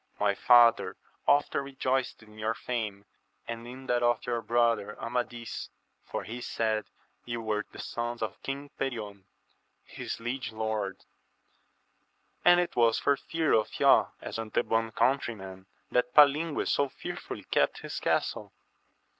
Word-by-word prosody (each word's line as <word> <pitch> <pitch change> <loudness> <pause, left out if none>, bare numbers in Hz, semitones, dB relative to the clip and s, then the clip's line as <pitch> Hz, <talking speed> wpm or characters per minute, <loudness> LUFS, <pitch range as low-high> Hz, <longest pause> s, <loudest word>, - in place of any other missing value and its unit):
my 105 -1 +3
father 120 +2 +5 0.3
often 145 0 +3
rejoiced 130 -3 -1
in 105 0 -15
your 110 +1 0
fame, 105 -5 -4 0.4
and 115 0 -6
in 130 +2 -9
that 120 -1 +1
of 120 +1 +2
your 120 -2 -1
brother 115 -2 +1
Amadis, 120 -1 -4 0.3
for - - -4
he 120 +3 -6
said 110 -2 -1 0.4
you 120 -1 -4
were 110 -2 -1
the - - -12
sons 120 0 -3
of 110 - -5
King 140 +1 -5
Perion, 105 -7 -4 0.6
his - - -6
liege 120 +1 -3
lord; 110 -3 -3 1.4
and 175 0 +7
it 175 - -1
was 115 -2 +4
for 140 - +3
fear 160 +2 -1
of 110 -1 +1
ye, - - +6 0.2
as - - -5
Antebon's 115 0 0
countrymen, 110 -7 -1 0.2
that 125 0 +1
Palingues 150 +2 +5
so 140 -1 +2
fearfully - - -7
kept - - +1
his - - -5
castle. - - -1
120 Hz, 140 wpm, -29 LUFS, 110-130 Hz, 1.4 s, and